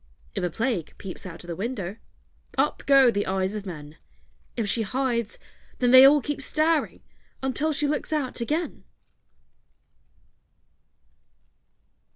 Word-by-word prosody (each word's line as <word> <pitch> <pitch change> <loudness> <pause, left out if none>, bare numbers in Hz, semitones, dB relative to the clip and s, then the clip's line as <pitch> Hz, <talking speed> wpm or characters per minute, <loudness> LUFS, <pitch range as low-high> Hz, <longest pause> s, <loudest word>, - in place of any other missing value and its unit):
If - - -3
a 180 - +1
Plague 220 - -2
peeps 190 0 -8
out 170 -1 -9
of - - -13
the 170 - -4
window, 200 -1 -4 0.6
Up - - +1
go 270 -3 +6
the 205 -2 -2
eyes 190 +1 -1
of 210 -2 -6
men; 150 -3 -9 0.6
If 225 -3 -1
she 225 +3 +1
hides, 235 0 -2 0.4
then 245 -1 +2
they 260 +1 +10
all 290 +1 +6
keep 290 +1 -4
staring 310 +3 0 0.4
Until 285 +4 0
she 295 0 +1
looks 295 +1 -2
out 280 -5 -2
again. 310 +8 -2
235 Hz, 135 wpm, -25 LUFS, 190-275 Hz, 0.6 s, they